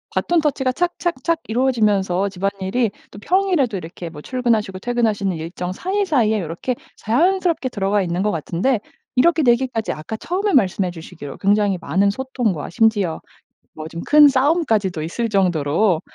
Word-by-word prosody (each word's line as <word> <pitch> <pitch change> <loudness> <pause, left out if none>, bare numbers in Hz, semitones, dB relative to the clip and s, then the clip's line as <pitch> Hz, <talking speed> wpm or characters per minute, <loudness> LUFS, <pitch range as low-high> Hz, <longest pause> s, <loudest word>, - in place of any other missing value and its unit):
배턴 345 -1 +2
터치가 275 -4 0
착착착 335 0 -1
이루어지면서 210 -6 +1
집안일이 195 +4 -1 0.2
또 205 - -11
평일에도 350 - +1
이렇게 175 -1 -7
뭐 150 -2 -10
출근하시고 225 -4 -1
퇴근하시는 215 -5 0
일정 175 +3 -5
사이사이에 305 - +1
요렇게 175 +9 -3 0.2
자연스럽게 335 - +1
들어가 205 -3 0
있는 175 0 -1
것 210 - +1
같은데 180 - 0 0.4
이렇게 320 +5 +4
되기까지 240 -2 +1
아까 155 +8 -6
처음에 380 - -2
말씀해 190 - +2
주시기로 160 -4 -9
굉장히 205 -1 +2
많은 190 +7 +2
소통과 235 - -2
심지어 205 -5 +1 0.6
뭐 155 0 -7
좀 165 +1 -7
큰 295 0 +7
싸움까지도 260 - +1
있을 225 +9 -2
정도로 175 -2 +2
215 Hz, 385 characters per minute, -20 LUFS, 185-265 Hz, 0.6 s, 큰